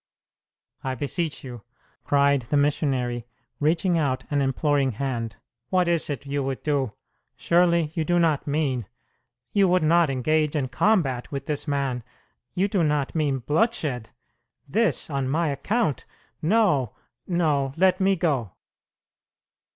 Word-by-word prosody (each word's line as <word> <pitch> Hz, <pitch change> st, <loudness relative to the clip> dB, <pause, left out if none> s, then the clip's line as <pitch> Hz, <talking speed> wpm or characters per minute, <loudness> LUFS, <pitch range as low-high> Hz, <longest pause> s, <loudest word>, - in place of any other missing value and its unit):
"I 130 Hz, -1 st, -2 dB
beseech 150 Hz, +4 st, -3 dB
you!" 120 Hz, -4 st, -8 dB, 0.4 s
cried 140 Hz, -1 st, +3 dB
the 145 Hz, -, +2 dB
missionary, 130 Hz, -5 st, 0 dB, 0.3 s
reaching 165 Hz, +3 st, +2 dB
out 135 Hz, -4 st, 0 dB
an 145 Hz, -1 st, +2 dB
imploring 135 Hz, 0 st, +1 dB
hand. 115 Hz, -3 st, -3 dB, 0.3 s
"What 180 Hz, -1 st, +2 dB
is 170 Hz, -2 st, +1 dB
it 145 Hz, -1 st, -4 dB
you 140 Hz, 0 st, -2 dB
would 135 Hz, -1 st, -3 dB
do? 140 Hz, -7 st, 0 dB, 0.4 s
Surely 170 Hz, -2 st, +2 dB
you 160 Hz, -, -1 dB
do 175 Hz, +2 st, +1 dB
not 160 Hz, -5 st, +1 dB
mean 140 Hz, -7 st, -1 dB, 0.6 s
you 200 Hz, -2 st, +4 dB
would 180 Hz, -1 st, +3 dB
not 165 Hz, 0 st, +4 dB
engage 150 Hz, +4 st, +1 dB
in 135 Hz, -4 st, -1 dB
combat 135 Hz, -, +1 dB
with 140 Hz, -1 st, -4 dB
this 150 Hz, 0 st, -3 dB
man 135 Hz, -4 st, -1 dB, 0.5 s
you 190 Hz, +2 st, +2 dB
do 195 Hz, -4 st, +1 dB
not 150 Hz, -3 st, 0 dB
mean 140 Hz, -5 st, 0 dB
bloodshed? 150 Hz, -, 0 dB, 0.6 s
This 200 Hz, -, +1 dB
on 135 Hz, -2 st, -1 dB
my 160 Hz, +3 st, +1 dB
account 155 Hz, -, -1 dB, 0.4 s
no, 160 Hz, -, +2 dB, 0.3 s
no! 150 Hz, -6 st, +1 dB
Let 185 Hz, +1 st, +3 dB
me 195 Hz, +1 st, +3 dB
go." 140 Hz, -, -1 dB
145 Hz, 135 wpm, -25 LUFS, 135-170 Hz, 0.6 s, you